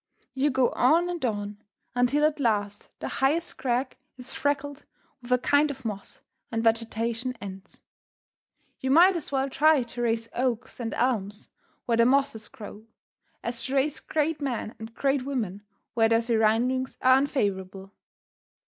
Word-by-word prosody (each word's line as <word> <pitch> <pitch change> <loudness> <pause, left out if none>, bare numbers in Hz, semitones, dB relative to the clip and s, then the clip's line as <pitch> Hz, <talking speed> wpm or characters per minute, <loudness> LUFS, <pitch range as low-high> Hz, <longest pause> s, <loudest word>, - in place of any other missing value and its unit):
You 275 +2 +1
go 260 -2 +2
on 330 +8 +3
and 345 -4 -4
on, 205 -2 -3 0.3
until 250 +5 +2
at 305 0 +1
last 205 -5 -1
the - - -3
highest 305 +6 0
crag 255 +1 -1 0.2
is 250 0 -8
freckled 285 0 -2 0.4
with 245 0 -10
a 250 - +6
kind 285 +4 +3
of 265 -3 -8
moss, 205 -3 -6 0.3
and 225 -1 -1
vegetation 230 +2 0
ends. 195 -1 -10 1.0
You 260 - -2
might 350 +7 +6
as 330 - -4
well 270 -1 +1
try 295 0 +4
to 240 +1 -7
raise 230 -1 0
oaks 245 -1 -2
and 230 -2 -3
elms 210 -5 -1 0.4
where 230 -1 +1
the 235 0 +5
mosses 265 -4 +1
grow, 220 -3 -11 0.6
as 235 0 -3
to 265 - -2
raise 275 +2 +1
great 310 0 -1
men 245 -5 -3
and 220 +1 -8
great 275 -1 +1
women 235 -8 -3 0.3
where 225 -2 +3
their 230 0 +4
surroundings 235 +3 +1
are 255 0 +7
unfavorable. 195 -8 -2
245 Hz, 155 wpm, -27 LUFS, 225-275 Hz, 1.0 s, are